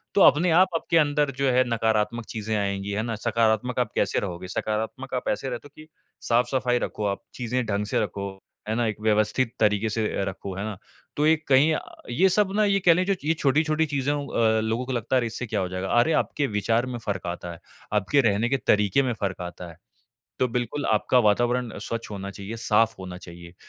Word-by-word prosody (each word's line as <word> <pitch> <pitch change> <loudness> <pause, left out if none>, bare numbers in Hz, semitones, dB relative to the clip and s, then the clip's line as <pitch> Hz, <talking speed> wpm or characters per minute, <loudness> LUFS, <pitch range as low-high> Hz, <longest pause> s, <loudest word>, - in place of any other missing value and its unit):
तो 200 - +5
अपने 170 +2 +6
आप 180 +4 +6
आपके 165 +1 +1
अंदर 145 -2 +2
जो 140 -1 +2
है 125 +1 +4
नकारात्मक 110 0 0
चीज़ें 110 0 -3
आएँगी 100 0 -2
है 105 +2 -1
ना। 115 -1 -3
सकारात्मक 115 +2 +1
आप 120 -4 0
कैसे 100 - +1
रहोगे, 90 -2 -5
सकारात्मक 110 +7 -3
आप 125 - -2
ऐसे 135 - -2
रहते 125 +3 -6
हो 145 - -26
कि 155 - -14 0.4
साफ़-सफ़ाई 125 +1 +2
रखो 105 - -3
आप, 100 -1 -1
चीज़ें 125 0 -2
ढंग 105 -1 -1
से - - 0
रखो, 100 0 -4 0.4
है 110 - 0
ना, 120 0 +1
एक 110 - -3
व्यवस्थित 110 +3 +1
तरीके 105 0 +2
से 110 0 -1
अ, - - -1
रखो, 95 0 -7
है 100 - -3
ना। 110 -3 -5 0.4
तो 150 - +1
ये 160 - +6
कहीं 140 +4 +5
अ, - - 0 0.3
ये 180 +11 +3
सब 195 +1 +2
ना 215 - +3
ये 200 -1 +2
कह 170 - +8
लें 180 +2 +1
जो 195 0 +1
ये 160 - +3
छोटी-छोटी 155 +1 +2
चीज़ों 145 -1 -1
अ, 110 -3 +2
लोगों 110 +3 -1
को 130 - -5
लगता 120 +2 -1
है 130 - +5
अरे! 120 - -1
इससे 115 +2 -5
क्या 105 -1 -1
हो 95 - -1
जाएगा, 95 +1 -4
अरे! 120 +7 +3
आपके 145 -2 -2
विचार 115 +3 0
में 125 -1 -5
फ़र्क 100 -5 -4
आता 85 0 -5
है, 85 - -10 0.3
आपके 105 +7 +3
रहने 105 +4 0
के 135 - +2
तरीक़े 105 +5 +4
में 125 -2 0
फ़र्क 100 -4 -3
आता 90 0 -7
है। 85 - -14 0.6
तो 130 - +3
बिल्कुल 125 +4 -2
आपका 110 +4 +3
वातावरण 120 +2 +2
स्वच्छ 115 0 -5
होना 100 -1 -5
चाहिए, 100 +3 -7
साफ़ 115 0 +2
होना 90 -1 -7
चाहिए 85 -1 -12
115 Hz, 225 wpm, -25 LUFS, 105-130 Hz, 0.6 s, कह